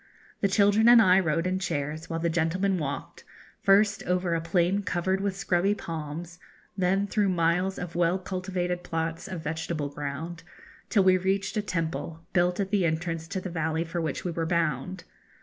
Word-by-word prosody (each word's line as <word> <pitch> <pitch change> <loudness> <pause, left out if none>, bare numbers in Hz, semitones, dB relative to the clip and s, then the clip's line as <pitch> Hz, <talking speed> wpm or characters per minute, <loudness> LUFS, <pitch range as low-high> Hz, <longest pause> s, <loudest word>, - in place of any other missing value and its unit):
The 200 - +2
children 205 +3 +4
and 240 -1 +9
I 190 -4 +6
rode 165 -1 0
in 185 +1 0
chairs, 155 -3 -3
while 165 - -2
the 170 - 0
gentlemen 175 +3 +1
walked, 140 -2 -5 0.4
first 205 -1 +4
over 180 -1 0
a 165 - 0
plain 175 +4 +1
covered 190 0 -1
with 195 -1 -2
scrubby 195 +1 +1
palms, 165 0 -6 0.4
then 190 +1 +1
through 205 -1 +1
miles 180 +2 +1
of 175 -1 -5
well 175 +1 +2
cultivated 185 -1 -3
plots 165 +1 -3
of 185 -4 -5
vegetable 160 -1 -3
ground, 145 +4 -5 0.5
till 200 - +4
we 185 0 +5
reached 190 +2 -1
a 210 - +1
temple, 165 -3 -3
built 180 0 +2
at 195 -1 -1
the 205 -3 +2
entrance 165 0 -1
to 190 +2 -3
the 185 -1 -6
valley 160 -1 -1
for 170 +1 -3
which 160 - -3
we 175 - -1
were 165 0 -2
bound. 170 +1 -1
175 Hz, 180 wpm, -27 LUFS, 165-190 Hz, 0.5 s, and